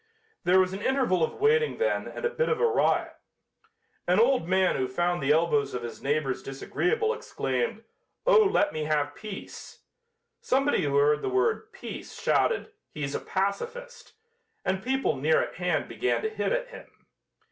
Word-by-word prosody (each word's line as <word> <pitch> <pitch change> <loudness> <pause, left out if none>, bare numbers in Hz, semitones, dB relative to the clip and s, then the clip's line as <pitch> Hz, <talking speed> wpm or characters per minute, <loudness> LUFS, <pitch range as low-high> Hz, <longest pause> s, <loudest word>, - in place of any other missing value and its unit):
There 185 +2 +5
was 185 0 +2
an 195 - -5
interval 250 -9 +1
of - - -1
waiting 460 +2 +3
then 480 +2 0
and - - -6
a - - +2
bit 480 0 0
of 465 - 0
a - - +3
riot. 440 -2 +1 0.9
An 180 +3 +3
old 245 -6 +3
man 185 0 +2
who 130 - 0
found 175 +6 -1
the 135 +1 +2
elbows 150 -4 +2
of 125 - -4
his 120 - -7
neighbors 140 -2 -1
disagreeable, 435 - -1
exclaimed: 470 0 -3 0.4
"Oh, - - +6
let 400 -7 +3
me 155 -1 -3
have 145 -1 0
peace!" 210 +1 -9 0.6
Somebody 275 -3 +2
who 140 -1 0
heard 150 +1 +3
the - - -2
word 435 +3 0
"peace" - - -9
shouted: 465 -1 +1 0.2
"He's 140 -2 -4
a - - -1
pacifist," 470 - -4 0.5
and 190 0 0
people 265 - 0
near 155 +4 +3
at - - -3
hand 180 -4 0
began 385 - -1
to 440 - 0
hit 440 - -2
at - - -1
him. - - -14
190 Hz, 170 wpm, -27 LUFS, -, 0.9 s, Oh